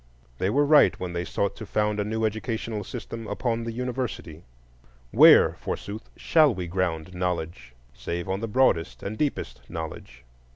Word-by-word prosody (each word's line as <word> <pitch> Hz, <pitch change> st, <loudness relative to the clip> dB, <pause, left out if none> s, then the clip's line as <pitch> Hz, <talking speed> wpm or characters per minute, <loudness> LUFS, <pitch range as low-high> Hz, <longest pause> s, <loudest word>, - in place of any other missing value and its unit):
They 95 Hz, -, +1 dB
were 145 Hz, +7 st, +3 dB
right 150 Hz, 0 st, +5 dB
when 90 Hz, -1 st, -4 dB
they 85 Hz, 0 st, -2 dB
sought 100 Hz, +2 st, -2 dB
to 110 Hz, -, -7 dB
found 105 Hz, 0 st, 0 dB
a -, -, +1 dB
new 110 Hz, +2 st, -1 dB
educational 110 Hz, -1 st, -3 dB
system 115 Hz, +3 st, -7 dB
upon 115 Hz, -2 st, -2 dB
the 115 Hz, -, -3 dB
University: 120 Hz, -9 st, -4 dB, 0.7 s
where, -, -, +7 dB
forsooth, 105 Hz, +2 st, -6 dB
shall 155 Hz, -7 st, +4 dB
we 90 Hz, -1 st, -4 dB
ground 90 Hz, -1 st, -2 dB
knowledge 85 Hz, -8 st, -4 dB, 0.2 s
save 85 Hz, +7 st, -5 dB
on 95 Hz, +1 st, -1 dB
the 115 Hz, -, -3 dB
broadest 85 Hz, -, +1 dB
and 100 Hz, +2 st, -4 dB
deepest 110 Hz, -, -3 dB
knowledge? 75 Hz, -7 st, -7 dB
100 Hz, 160 wpm, -26 LUFS, 85-115 Hz, 0.7 s, where